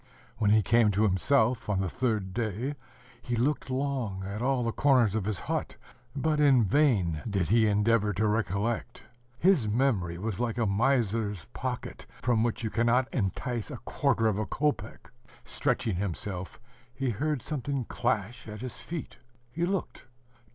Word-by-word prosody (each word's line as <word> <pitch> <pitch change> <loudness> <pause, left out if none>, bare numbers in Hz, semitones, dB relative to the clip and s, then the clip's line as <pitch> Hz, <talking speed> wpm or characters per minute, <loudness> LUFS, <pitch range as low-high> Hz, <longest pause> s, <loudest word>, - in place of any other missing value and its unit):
When 105 -2 +2
he 110 0 +5
came 115 -1 +4
to 105 +3 +2
himself, 110 +4 +2
on 100 -2 +1
the 95 - 0
third 105 -4 -1
day, 115 +5 -2 0.5
he 120 - -2
looked 130 +3 0
long 130 -8 -2
at 100 +3 -5
all 130 0 +1
the 115 - 0
corners 125 -6 +3
of 110 -3 -1
his 105 -4 -1
hut; - - -3 0.4
but 150 +2 +1
in 135 -5 +5
vain 95 - +2
did 95 -4 0
he 110 +1 +4
endeavor 105 +1 +2
to 105 +3 0
recollect; 110 +3 -1 0.3
his 170 - +3
memory 105 -7 +1
was 105 +2 -3
like 120 -1 -1
a 115 - +1
miser's 110 -3 +1
pocket, - - -5
from 120 -2 +2
which 115 0 -1
you 110 - -2
cannot 120 +2 +2
entice 120 +1 -2
a - - -6
quarter 115 - 0
of 105 -2 +2
a 110 - -2
kopek. 120 -7 -2 0.3
Stretching 115 -5 -1
himself, 95 0 -4 0.4
he 135 -2 -1
heard 145 +3 -1
something 140 -3 -2
clash 120 -1 -2
at 105 0 -7
his 130 -2 -5
feet. 165 -3 -7 0.3
He 170 +6 -1
looked 190 -8 -3
115 Hz, 160 wpm, -29 LUFS, 105-130 Hz, 0.5 s, he